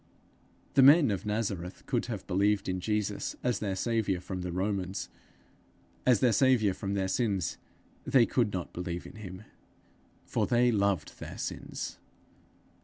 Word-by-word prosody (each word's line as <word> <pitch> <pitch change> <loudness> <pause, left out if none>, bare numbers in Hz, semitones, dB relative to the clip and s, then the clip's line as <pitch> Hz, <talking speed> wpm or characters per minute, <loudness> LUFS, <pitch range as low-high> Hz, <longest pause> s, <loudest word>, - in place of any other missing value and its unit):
The 135 - +6
men 140 -1 +7
of 100 +2 -3
Nazareth 100 -4 -3
could 120 -3 -1
have 110 -6 -5
believed 100 +2 +1
in 95 0 -1
Jesus 105 +1 -2
as 125 -4 +1
their 100 -3 -2
saviour 110 -3 0
from 90 0 -5
the 90 0 -4
Romans; 95 +1 -2 1.0
as 125 -5 +5
their 125 -3 +4
saviour 115 -4 +4
from 100 +1 -3
their 95 -1 0
sins 95 - -1 0.4
they 125 -4 +5
could 115 -4 +1
not 90 -3 -4
believe 90 -1 -4
in - - -11
him, 95 -1 -8 0.8
for - - 0
they 120 0 +4
loved 100 -3 0
their - - -7
sins. - - -5
100 Hz, 150 wpm, -30 LUFS, 95-115 Hz, 1.0 s, men